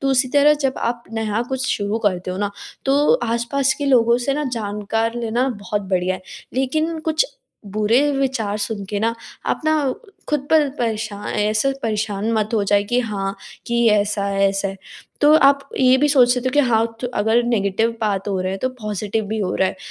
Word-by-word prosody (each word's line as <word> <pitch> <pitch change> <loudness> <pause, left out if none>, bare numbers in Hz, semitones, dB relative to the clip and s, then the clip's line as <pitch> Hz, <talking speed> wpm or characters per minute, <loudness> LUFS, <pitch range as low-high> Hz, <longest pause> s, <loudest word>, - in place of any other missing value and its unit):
तो 275 - 0
उसी 260 0 +2
तरह 295 +1 +6
जब 265 - -3
आप 235 0 -2
नया 220 0 -1
कुछ 260 -1 -2
शुरू 205 +2 -2
करते 185 -2 -1
हो 185 - -4
न 205 - -1 0.3
तो 285 - +3
आस-पास 240 +4 0
के 285 - -2
लोगों 235 -3 +4
से 275 - +1
न 295 -2 -1
जानकार 225 0 -2
लेना 240 +3 0
बहुत 205 -3 -3
बढ़िया 185 -1 0
है। 185 - -9 0.3
लेकिन 310 +5 0
कुछ 320 +8 +1 0.4
बुरे 210 +3 +1 0.2
विचार 260 -7 -1
सुन 205 -1 -3
के 205 - -1
न 230 +1 +1 0.3
आप - - 0
ना 310 0 +3 0.6
ख़ुद 290 -2 0
पर 310 -2 +4
परेशान 215 -3 -3
ऐसे 215 +6 +1
परेशान 215 -1 -1
मत 215 -1 0
हो 210 - +2
जाए 205 0 +2
कि 240 +4 +1
हाँ, 200 -4 -3 0.3
कि 235 0 +2
ऐसा 205 -1 +1
है 195 0 +2
ऐसा 195 0 -1
है। 195 - -7 0.5
तो 300 +1 +7
आप 275 -2 +4
ये 255 0 +6
भी 295 +1 +3
सोच 250 -4 +5
सकते 250 +1 -1
हो - - -4
कि 290 - +4
हाँ, 225 -1 +3
तो 245 - -2
अगर 220 +3 +2
नेगेटिव 225 0 0
बात 200 -2 -1
हो 195 -2 -1
रहा 185 +1 -2
है 195 - -4
तो 255 - 0
पॉज़िटिव 210 +1 -2
भी 220 +2 -3
हो 185 -3 -1
रहा 190 - +2
है। - - -7
225 Hz, 205 wpm, -20 LUFS, 205-260 Hz, 0.6 s, तो